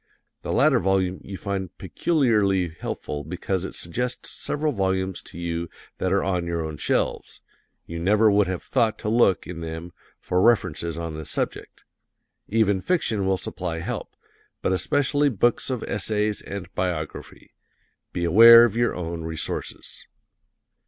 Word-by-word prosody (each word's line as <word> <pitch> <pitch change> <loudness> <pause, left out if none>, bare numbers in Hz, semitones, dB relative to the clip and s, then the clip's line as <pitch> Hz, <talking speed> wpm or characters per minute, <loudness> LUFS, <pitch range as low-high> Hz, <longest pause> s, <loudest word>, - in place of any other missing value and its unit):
The - - -4
latter - - +4
volume 95 0 0
you 100 -1 -7
find 95 -2 -4
peculiarly 100 - +1
helpful 75 -2 -5
because 90 +3 -3
it - - -7
suggests 125 +9 -3
several 150 +1 -2
volumes 95 -4 -1
to - - -13
you 85 -1 -3 0.3
that - - 0
are - - +2
on 90 -2 -1
your 85 -1 -2
own 80 -1 -6
shelves - - -1 0.4
you 85 0 -6
never 105 +5 +4
would 100 -1 +3
have 90 -1 -3
thought 115 -4 +1
to 105 - -3
look 110 -5 +3
in 85 -2 -7
them 80 +1 -6 0.3
for 90 0 0
references 90 -7 +2
on 85 -1 -4
this 80 -1 -6
subject. - - -4 0.6
Even 100 -3 +2
fiction 115 - 0
will 95 0 +2
supply 90 -2 -4
help, 80 - -5 0.5
but - - +1
especially 145 - +2
books 120 +2 +1
of 125 -3 -2
essays 105 +1 -1
and 95 -3 -7
biography. 85 -4 -4 0.6
Be 85 - -3
aware 115 +7 +9
of 115 -3 +2
your 120 0 +1
own 85 -1 -4
resources. 80 -1 -4
95 Hz, 150 wpm, -24 LUFS, 85-110 Hz, 0.6 s, aware